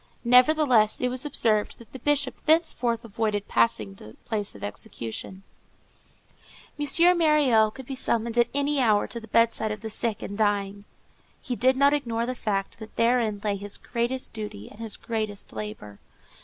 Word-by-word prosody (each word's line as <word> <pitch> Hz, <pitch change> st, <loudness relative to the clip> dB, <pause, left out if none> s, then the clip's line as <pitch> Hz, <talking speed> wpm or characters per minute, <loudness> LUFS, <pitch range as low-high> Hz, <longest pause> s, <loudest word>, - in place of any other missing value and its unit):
Nevertheless, 250 Hz, -3 st, +4 dB
it 250 Hz, -, 0 dB
was 255 Hz, +3 st, -3 dB
observed 215 Hz, -6 st, +1 dB
that 235 Hz, -, -16 dB
the 260 Hz, -, -8 dB
Bishop 285 Hz, 0 st, -1 dB
thenceforth 255 Hz, -8 st, +2 dB
avoided 210 Hz, -2 st, -2 dB
passing 110 Hz, -4 st, +1 dB
the 105 Hz, +2 st, -13 dB
place 210 Hz, -, -3 dB
of 100 Hz, -, -11 dB
execution. 115 Hz, -, -6 dB, 1.4 s
M. 340 Hz, +5 st, +4 dB
Myriel 285 Hz, -9 st, +4 dB
could 265 Hz, +4 st, -11 dB
be 270 Hz, -, -6 dB
summoned 235 Hz, -2 st, -1 dB
at 240 Hz, -1 st, +4 dB
any 285 Hz, +1 st, 0 dB
hour 215 Hz, -5 st, +3 dB
to 235 Hz, -, -7 dB
the 225 Hz, -, -12 dB
bedside 230 Hz, -1 st, +2 dB
of 210 Hz, -1 st, -5 dB
the 220 Hz, 0 st, -5 dB
sick 220 Hz, -1 st, -2 dB
and 200 Hz, -, -6 dB
dying. 200 Hz, -1 st, -1 dB, 0.5 s
He 250 Hz, -, -4 dB
did 260 Hz, +2 st, +2 dB
not 280 Hz, +1 st, +5 dB
ignore 235 Hz, -5 st, -1 dB
the 255 Hz, -, -2 dB
fact 205 Hz, -3 st, -3 dB
that 220 Hz, -1 st, -11 dB
therein 230 Hz, -3 st, +1 dB
lay 205 Hz, -2 st, 0 dB
his 200 Hz, +1 st, -6 dB
greatest 245 Hz, +2 st, -3 dB
duty 210 Hz, -, -7 dB
and 210 Hz, -, -15 dB
his 225 Hz, -2 st, -5 dB
greatest 215 Hz, -3 st, -4 dB
labor. 105 Hz, -1 st, -7 dB
230 Hz, 170 wpm, -26 LUFS, 205-255 Hz, 1.4 s, not